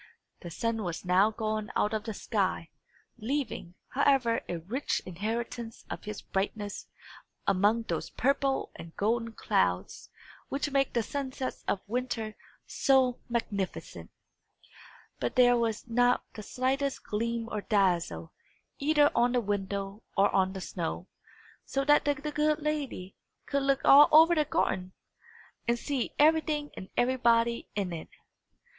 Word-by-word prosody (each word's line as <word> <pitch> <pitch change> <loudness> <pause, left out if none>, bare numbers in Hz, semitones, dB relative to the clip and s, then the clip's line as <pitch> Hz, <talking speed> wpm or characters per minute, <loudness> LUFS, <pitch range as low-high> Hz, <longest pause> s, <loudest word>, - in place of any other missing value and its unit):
The 175 - -8
sun 225 +6 -2
was 175 -2 -4
now 185 +4 +4
gone 215 -1 -3
out 210 - +1
of 215 -1 -2
the 220 - -3
sky, 190 -7 -1 0.5
leaving, 230 -7 -3
however, 260 -4 +2
a 175 - -2
rich 215 - -2
inheritance 225 +5 -4
of - - -6
his 210 0 -6
brightness 205 +1 -3 0.6
among 205 +5 +3
those - - -3
purple 275 0 0
and 165 0 -11
golden 230 +2 0
clouds 90 - -1 0.4
which 280 +1 -2
make 275 -1 +1
the 235 - +1
sunsets 265 0 -4
of 190 - 0
winter 230 -2 -3 0.3
so 260 -2 +2
magnificent. 205 -5 -3 1.1
But - - -2
there 245 -1 +6
was 230 -1 -1
not 245 +1 +3
the 215 - -7
slightest 265 +5 -1
gleam 230 +2 -2
or 210 - -2
dazzle, 175 - 0 0.5
either 295 0 +4
on 240 +1 +3
the 250 - +3
window 200 0 -3 0.2
or 200 +1 +4
on 190 0 +2
the 190 - -6
snow; 175 0 -4 0.5
so 275 0 -2
that 295 0 +5
the 290 0 +2
good 300 +1 0
lady 290 -11 -4 0.3
could 280 0 0
look 275 0 +2
all 285 +2 +9
over 320 +3 +8
the 305 -3 +2
garden, 185 -8 -1 0.7
and 235 0 +2
see 270 0 -2
everything 305 -1 +3
and 185 - -8
everybody 235 -2 +2
in 195 -4 -2
it. 160 - -7
230 Hz, 140 wpm, -29 LUFS, 200-270 Hz, 1.1 s, all